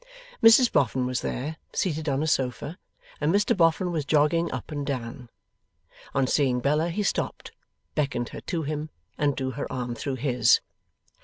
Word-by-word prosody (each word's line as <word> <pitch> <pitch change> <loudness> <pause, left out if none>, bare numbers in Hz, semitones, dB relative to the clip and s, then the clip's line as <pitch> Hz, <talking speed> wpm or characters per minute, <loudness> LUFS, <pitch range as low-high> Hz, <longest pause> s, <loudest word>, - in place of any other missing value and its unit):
Mrs 230 +2 +7
Boffin 130 -1 +2
was 125 0 -1
there, 150 +5 -3 0.2
seated 160 -4 -1
on 140 +2 0
a - - 0
sofa, 135 +3 -1 0.4
and 150 +2 +1
Mr 205 +2 +2
Boffin 175 0 +2
was 160 -3 -1
jogging 155 +3 +2
up 130 +4 -6
and 145 -1 -3
down. 125 -3 -5 0.9
On 135 -1 +3
seeing 130 -2 +2
Bella 150 +6 +1
he 205 +5 -1
stopped, - - -2 0.4
beckoned 140 -5 -1
her - - -8
to 170 -3 -3
him, 150 +1 -3 0.3
and 145 -2 +2
drew 130 -1 -2
her 135 +3 -5
arm 125 -1 -3
through 130 +4 -3
his. 125 -1 +3
145 Hz, 165 wpm, -26 LUFS, 130-160 Hz, 0.9 s, Mrs